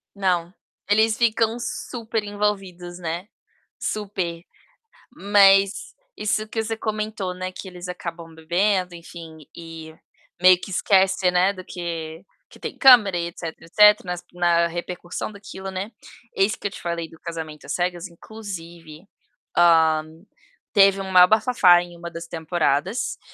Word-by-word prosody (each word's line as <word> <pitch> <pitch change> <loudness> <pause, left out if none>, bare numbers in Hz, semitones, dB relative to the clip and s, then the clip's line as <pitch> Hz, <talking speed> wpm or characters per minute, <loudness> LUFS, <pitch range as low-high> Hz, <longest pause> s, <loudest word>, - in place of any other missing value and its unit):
Não, 180 -2 0 0.4
eles 220 +1 +3
ficam 225 -1 +1
super 230 -2 -4
envolvidos, 195 -4 -3
né. 170 +2 -4 0.5
Super. 185 -5 -4 0.7
Mas 200 - +3 0.2
isso 215 +1 -1
que 225 0 -2
você 225 0 -3
comentou, 215 -4 -3
né, 185 0 -5
que 190 - -9
eles 180 -1 -9
acabam 170 -2 -7
bebendo, 180 +3 0
enfim, 165 -1 -11 0.2
e 165 -1 -10 0.5
meio 185 -1 +6
que 195 - -8
esquece, 190 0 +2
né, 180 +2 +3
do 185 -2 -10
que 165 -2 -6 0.3
que - - -17
tem - - -6
câmera 235 -9 +7
e 170 - -2
etc., 170 -1 -6
etc., 210 +5 +5
nas 180 -1 -5
na 170 -1 +2
repercussão 175 +3 -6
daquilo, 195 -1 -8
né. 190 +4 -4 0.5
Eis 195 +2 +2
que - - -4
eu - - -16
te - - -10
falei 170 -1 -4
do 165 - -17
Casamento 160 -3 -7
às - - -3
Cegas, 175 0 -2
inclusive, 170 -4 -10 0.5
ah, 160 -2 +5 0.7
teve 195 -2 +5
o 195 - -4
maior 180 -1 +6
bafafá 215 -5 +5
em 175 -1 -11
uma 170 - -7
das 170 0 -8
temporadas 165 - -1
180 Hz, 140 wpm, -23 LUFS, 170-205 Hz, 0.7 s, câmera